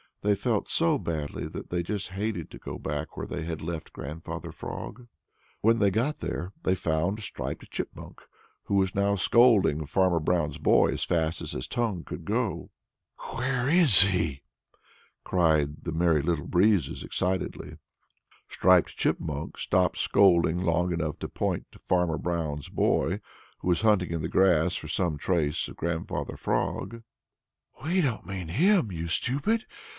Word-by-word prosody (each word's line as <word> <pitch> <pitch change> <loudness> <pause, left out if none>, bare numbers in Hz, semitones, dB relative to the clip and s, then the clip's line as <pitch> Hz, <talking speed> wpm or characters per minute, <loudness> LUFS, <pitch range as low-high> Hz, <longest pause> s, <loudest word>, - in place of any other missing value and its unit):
They 105 0 +4
felt 105 +1 -1
so 165 -2 +2
badly 75 -3 -3
that - - -8
they 90 0 0
just 100 +2 -4
hated 100 -3 -3
to - - -10
go - - -6
back 75 0 -4
where - - -3
they 85 - -4
had 80 -1 -4
left 80 -1 -5
Grandfather 75 +4 -6
Frog. 125 -1 -7 0.5
When 115 +2 +4
they 100 - +4
got 120 +10 0
there, 85 +3 -4
they 95 - +2
found 90 +4 -1
Striped - - -6
Chipmunk, - - -6 0.4
who 100 -1 +2
now 100 +1 +2
was 100 -2 0
scolding 105 -12 +4
Farmer 90 +2 +2
Brown's 80 -2 0
boy - - +4
as - - -2
fast 80 -1 0
as - - -5
his 60 - -4
tongue 110 -8 -1
could 85 - -8
go. 110 -3 -1 0.7
"Where 125 +1 0
is 155 - +6
he?" 85 -8 +1 0.8
cried 80 -4 +1
the 80 - -3
Merry 80 -2 +2
Little 80 -1 -1
Breezes 90 -5 +2
excitedly. 95 +1 -2 0.7
Striped - - +3
Chipmunk 75 -3 -2
stopped 90 -1 +1
scolding 90 -3 +4
long 90 0 +1
enough 80 -3 -2
to - - -5
point - - -2
to - - -16
Farmer 90 -3 +1
Brown's 80 -5 -3
boy, 95 +6 +1 0.4
who - - -6
was 85 +1 +2
hunting 105 -6 +3
in 85 -1 -2
the 80 - -2
grass 90 -2 +3
for - - -5
some 80 0 0
trace 80 -1 0
of - - -10
Grandfather 85 -1 -3
Frog. 115 0 -2 0.8
"We 180 +5 +2
don't 125 - -1
mean 95 -2 -5
him, 170 - +3
you 85 -1 -4
stupid! 145 - 0
90 Hz, 155 wpm, -27 LUFS, 80-105 Hz, 0.8 s, is